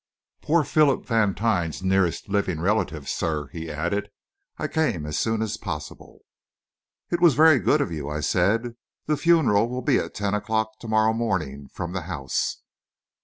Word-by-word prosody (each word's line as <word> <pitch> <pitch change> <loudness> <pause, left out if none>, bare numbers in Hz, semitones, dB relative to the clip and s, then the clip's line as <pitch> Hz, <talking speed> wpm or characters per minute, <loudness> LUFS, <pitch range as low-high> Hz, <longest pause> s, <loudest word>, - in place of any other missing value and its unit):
"Poor 160 +1 +2
Philip 145 -3 +2
Vantine's 105 -6 0
nearest 95 -2 +1
living 100 -5 -1
relative, 85 -6 -1
sir," 75 -4 -2
he 80 +1 -7
added. 85 +7 -2 0.5
"I - - -2
came 120 - 0
as 75 0 -2
soon 110 -1 0
as 110 - -3
possible." 75 0 -7 0.9
"It 175 0 0
was 170 -7 +6
very 155 -2 +6
good 95 - +2
of - - -2
you," 75 -3 -4
I 75 0 -3
said. 110 +9 +1 0.3
"The 150 - +1
funeral 145 -10 +3
will 125 +1 -4
be 140 -4 +3
at - - -5
ten 100 -1 -1
o'clock 110 +1 -1
to 115 - -9
morrow 110 0 +3
morning, 85 -12 -2
from 85 0 -5
the 95 - -2
house." 70 -6 -2
105 Hz, 165 wpm, -24 LUFS, 80-115 Hz, 0.9 s, was